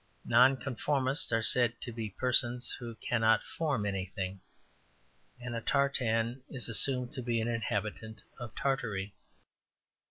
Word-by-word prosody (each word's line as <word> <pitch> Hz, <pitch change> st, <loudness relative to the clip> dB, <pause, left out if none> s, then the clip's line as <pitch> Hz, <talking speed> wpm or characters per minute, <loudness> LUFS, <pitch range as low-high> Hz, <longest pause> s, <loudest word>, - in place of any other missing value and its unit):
Nonconformists 130 Hz, +2 st, +3 dB
are 115 Hz, 0 st, +1 dB
said 120 Hz, -1 st, +3 dB
to 120 Hz, -, -4 dB
be 110 Hz, -2 st, -5 dB
persons 125 Hz, +2 st, +1 dB
who 115 Hz, -2 st, -7 dB
cannot 115 Hz, -1 st, +2 dB
form 145 Hz, -10 st, -2 dB
anything, 95 Hz, -1 st, -4 dB, 1.0 s
and 120 Hz, 0 st, -6 dB
a 115 Hz, -, -3 dB
tartan 125 Hz, -3 st, +1 dB
is 130 Hz, -4 st, -4 dB
assumed 125 Hz, +2 st, +2 dB
to 135 Hz, -, -4 dB
be 120 Hz, -1 st, 0 dB
an 110 Hz, -, -1 dB
inhabitant 110 Hz, -1 st, -3 dB, 0.2 s
of 120 Hz, -3 st, -8 dB
Tartary. 105 Hz, -8 st, -2 dB
120 Hz, 125 wpm, -31 LUFS, 110-130 Hz, 1.0 s, Nonconformists